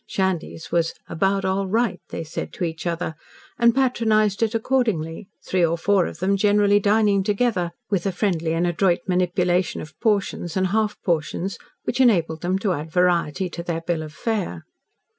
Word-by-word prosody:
Shandy's 185 -4 -2
was 165 -1 +1
"about 195 +4 0
all 190 +1 0
right," 230 +4 0
they - - -4
said 155 - -5
to - - -4
each 165 0 -3
other, 170 -1 -2 0.5
and 235 -1 +5
patronised 220 -6 +2
it 225 0 +1
accordingly, 220 -8 0 0.2
three 185 -1 +1
or 170 0 +2
four 195 +1 +2
of - - -8
them 195 +2 +1
generally 205 0 +4
dining 205 -1 +3
together, 205 -3 0 0.2
with 195 -1 +1
a - - +1
friendly 175 -4 0
and 170 +2 +1
adroit 175 +1 +2
manipulation 180 -1 +1
of 155 - -9
"portions" 200 -5 0
and 190 - +2
"half 215 -1 0
portions" 175 +2 -1 0.2
which 255 - 0
enabled 170 -10 +3
them 180 +2 0
to 195 -1 0
add 155 0 -5
variety 180 0 +1
to 170 - -5
their 170 -1 -3
bill 165 -1 -1
of 155 -1 -7
fare. 180 - -3
185 Hz, 175 wpm, -23 LUFS, 170-210 Hz, 0.5 s, and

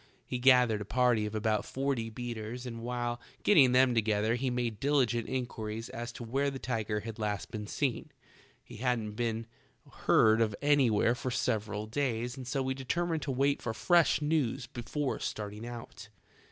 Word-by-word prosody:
He 125 - -3
gathered 125 -4 +5
a - - -2
party 120 -1 +2
of 105 - -6
about 110 -1 +1
forty 135 -4 -2
beaters 120 +1 -6
and 115 -2 -6
while 120 0 -3 0.2
getting 145 -11 +6
them 130 0 +5
together 110 -1 +1
he 130 +2 0
made 120 -4 -2
diligent 125 -5 +1
inquiries 115 -3 -4
as 120 +1 -5
to - - -8
where 135 +5 0
the 135 - -5
tiger 110 -4 -2
had 115 +1 -7
last 105 -2 -2
been 105 -2 -5
seen. 130 +1 -2 0.5
He - - -11
hadn't 120 -3 -1
been 115 0 -2 0.6
heard 110 +1 +5
of 110 -2 +1
any 145 -3 +4
where 110 +2 +3
for 125 +1 -4
several 110 -4 -1
days 120 0 -2
and 130 -2 -8
so 135 +1 -1
we 130 0 -1
determined 160 +5 -1
to 140 - -2
wait 140 +2 +1
for 110 -2 -3
fresh 170 -1 +3
news 150 -6 0
before 125 +4 -3
starting 105 +2 -5
out. 115 -2 -9
120 Hz, 175 wpm, -31 LUFS, 110-130 Hz, 0.6 s, getting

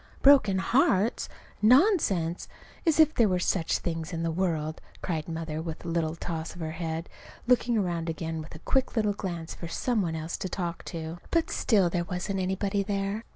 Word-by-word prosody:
"Broken 270 -9 +6
hearts! 215 0 +2 0.3
Nonsense! 215 - +3 0.4
As 320 -1 +3
if 310 -1 +6
there 230 -7 +4
were 180 - +2
such 175 -1 +1
things 165 -1 -4
in 165 -1 -3
the 165 - 0
world!" 160 -3 -1 0.2
cried 160 -3 -2
Mother, 160 -1 -3
with 165 +1 -6
a - - -3
little 165 -1 0
toss 165 -1 -4
to - - -13
her 160 -1 -3
head, 165 0 -4 0.4
looking 240 -1 +3
around 175 -4 -1
again 160 0 -3
with 155 - -10
a 160 - -13
quick 265 -1 +1
little 210 -3 +2
glance 170 -5 -5
for 170 - -7
some 230 +6 0
one 165 -3 -1
else 160 +1 -4
to 185 - -4
talk 170 -3 -3
to. 165 +1 -6
But 330 -1 +1
still 200 -6 +3
there 175 -1 0
wasn't 185 +2 -3
anybody 195 +2 0
there. 200 +2 -2
180 Hz, 190 wpm, -28 LUFS, 165-205 Hz, 0.4 s, Broken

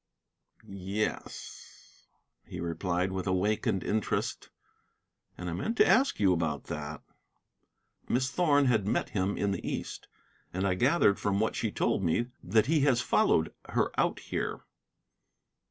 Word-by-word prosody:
"Yes," 100 +2 -6 0.4
he 90 - -8
replied 85 +2 -1
with 95 +1 -3
awakened 95 0 +1
interest, 110 0 -1 0.9
"and 90 - -6
I 85 - -2
meant 160 - -2
to - - +6
ask 270 +2 +3
you 95 -3 +4
about 80 -4 -1
that." 75 0 -6 1.1
"Miss 130 +2 +1
Thorn 145 -5 +3
had 110 -6 +2
met - - 0
him 95 0 -1
in 100 -1 0
the 95 - -3
East. - - -5 0.5
And 95 +2 0
I 95 - +2
gathered 120 - +3
from 100 -1 0
what 110 - 0
she 110 - -1
told - - 0
me 95 +8 0
that 110 -1 +3
he 155 +2 +2
has 135 -4 +3
followed 80 -7 +2 0.2
her - - +1
out - - +1
here." - - -4
100 Hz, 140 wpm, -30 LUFS, 90-120 Hz, 1.1 s, to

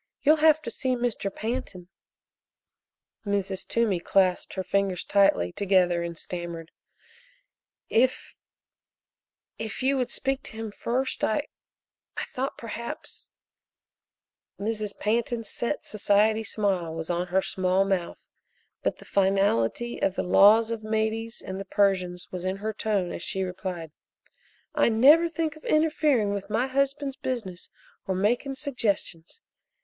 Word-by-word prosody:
You'll 305 +2 +6
have 310 0 +4
to - - -5
see 260 -2 -1
Mr. 240 -5 -2
Pantin." 215 -5 -4 1.4
Mrs. 200 -2 -1
Toomey 225 -6 +1
clasped 185 0 +1
her 190 - -2
fingers 190 -1 0
tightly 195 - +3
together 180 - +2
and 170 -1 -5
stammered: 170 -2 -6 1.2
"If 255 +3 +1 1.3
if 220 +3 -4
you 270 +1 +3
would 250 -2 0
speak 270 0 -1
to - - -10
him 220 -1 -5
first 250 +5 -2
I 285 +7 0 0.7
I - - -1
thought 265 +2 -4
perhaps 235 0 -7 0.7
" - - -51
Mrs. 210 0 -3
Pantin's 230 +1 -1
set 240 +5 -3
society 215 +1 +2
smile 195 -6 -1
was 165 +1 -3
on 175 +1 -1
her 190 +2 +1
small 185 +1 +1
mouth, 190 -3 -1 0.6
but - - -1
the - - -14
finality 195 - +1
of 190 - +1
the - - -1
laws 220 +5 +6
of 230 -1 -3
the 215 - -9
Medes 220 +1 -1
and 190 0 -5
the 195 - -5
Persians 185 -3 +1
was 180 -1 -5
in 185 +1 -1
her 215 +2 -3
tone 205 -4 -1
as - - -6
she 190 +2 -2
replied: 180 -3 -5 0.8
"I - - +3
never 290 +10 +6
think 325 -2 -2
of 310 - -15
interfering 300 -9 +2
with 200 0 -5
my 225 +4 +1
husband's 275 +1 -1
business 215 -9 -4 0.4
or 190 - 0
making 240 +8 0
suggestions. 230 - -2
210 Hz, 140 wpm, -26 LUFS, 185-240 Hz, 1.4 s, You'll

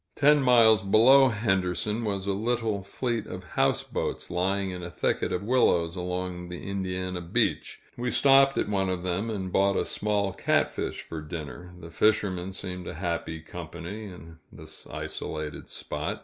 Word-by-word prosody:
Ten 150 +1 +5
miles 115 -5 +6
below 120 +7 +6
Henderson, 105 -1 0
was 100 -3 -2
a 100 - 0
little 110 0 -1
fleet 115 +3 -3
of 90 0 -7
houseboats, - - -1
lying 95 +2 0
in 90 0 -6
a 85 - -6
thicket - - -1
of 90 - -2
willows 90 -8 +2
along 90 -1 -4
the 90 +1 -7
Indiana 95 -2 -3
beach. 85 - -1
We 125 +1 -2
stopped 135 +1 +5
at - - +1
one 95 -2 0
of 90 -1 -2
them, 95 +5 -2
and 95 -4 -4
bought 100 0 +3
a - - +1
small 105 -2 0
catfish - - 0
for 80 -1 -7
dinner. 85 +3 -8
The 85 -1 -10
fishermen 95 -2 +1
seemed 90 -2 -6
a - - -6
happy 85 -2 -3
company, 85 +5 -8
in 85 -4 -11
this - - -13
isolated 75 -2 -6
spot. - - -4
95 Hz, 160 wpm, -27 LUFS, 90-110 Hz, -, miles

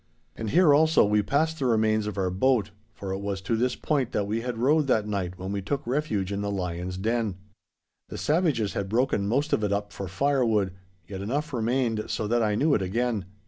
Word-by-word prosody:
And 110 -1 -4
here 165 - +5
also 155 -1 +5
we 105 0 +3
passed 155 +9 0
the 135 - +1
remains 110 -2 +2
of 105 - -5
our 95 -2 0
boat, 110 +1 +1 0.2
for 95 -1 -7
it 95 - -2
was 100 -1 -3
to 95 +4 -1
this 125 +2 0
point 140 -6 -1
that 105 - 0
we 110 +3 -2
had 120 -1 -4
rowed 145 +5 +3
that 110 -5 +2
night 95 -3 -3
when 95 +1 -5
we 100 0 -2
took 135 +9 -3
refuge 115 -7 -1
in 100 0 -2
the 100 - -2
lion's 90 -1 -3
den. 110 0 -1 0.7
The - - -6
savages 150 - +1
had 100 -1 -3
broken 115 -3 +1
most 140 +8 0
of 110 - +1
it 105 - 0
up 105 0 -2
for 100 - -5
firewood, 110 -3 +1 0.3
yet 95 -1 -6
enough 140 +9 -2
remained 115 -2 0
so 110 - -2
that 120 +3 +1
I 105 -2 +1
knew 145 +7 +2
it 105 - +2
again. 110 +1 -1
110 Hz, 220 wpm, -26 LUFS, 100-130 Hz, 0.7 s, here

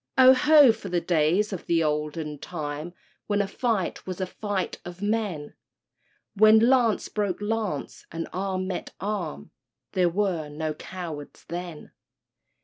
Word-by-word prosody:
_Oho! 260 +1 +7
for 215 -3 -8
the 175 0 +1
days 170 +5 +2
of 185 - -6
the 165 -1 +3
olden 150 0 -2
time, 155 +1 -5 0.3
When 205 -1 +1
a 200 - +1
fight 210 -4 -2
was 185 -1 -5
a 190 - 0
fight 200 0 -3
of 175 0 -9
men! 205 -8 -1 0.8
When 215 +1 +7
lance 235 -1 +3
broke 205 -3 -2
lance 205 -7 -3
and 165 0 -4
arm 185 0 -2
met 185 -1 -5
arm— 190 - -4 0.4
There 180 -2 +2
were 175 -5 -1
no 155 +1 -3
cowards 160 -3 -8
then! 175 -2 -6
185 Hz, 140 wpm, -26 LUFS, 160-210 Hz, 0.8 s, Oho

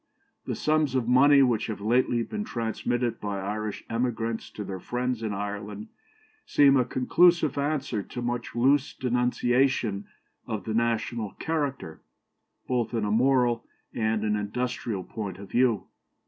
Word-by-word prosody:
The - - -1
sums 155 -3 +1
of 125 -3 0
money 140 +3 +6
which 120 -4 +1
have 110 -3 -4
lately 120 +2 +2
been 210 - -4
transmitted 120 - -2
by 100 -1 -3
Irish 105 +2 -4
emigrants 115 -1 -2
to 105 - -5
their 95 -1 -5
friends 125 +2 -2
in 110 -2 -2
Ireland 105 +1 -5 0.5
seem 140 -1 +5
a 125 -2 +3
conclusive 165 +4 +3
answer 140 -6 -1
to 120 - -7
much 120 -1 -3
loose 135 +4 +2
denunciation 125 -3 +1 0.4
of 110 -4 -3
the 110 - -3
national 115 -1 -1
character, 145 - -3 0.7
both 120 -2 -1
in 110 -2 0
a 105 - -1
moral 120 0 +3 0.3
and 110 -1 0
an 105 -1 +1
industrial 110 -1 -3
point 100 -4 -6
of 100 0 -11
view.... 120 -4 +2
120 Hz, 145 wpm, -27 LUFS, 105-130 Hz, 0.7 s, money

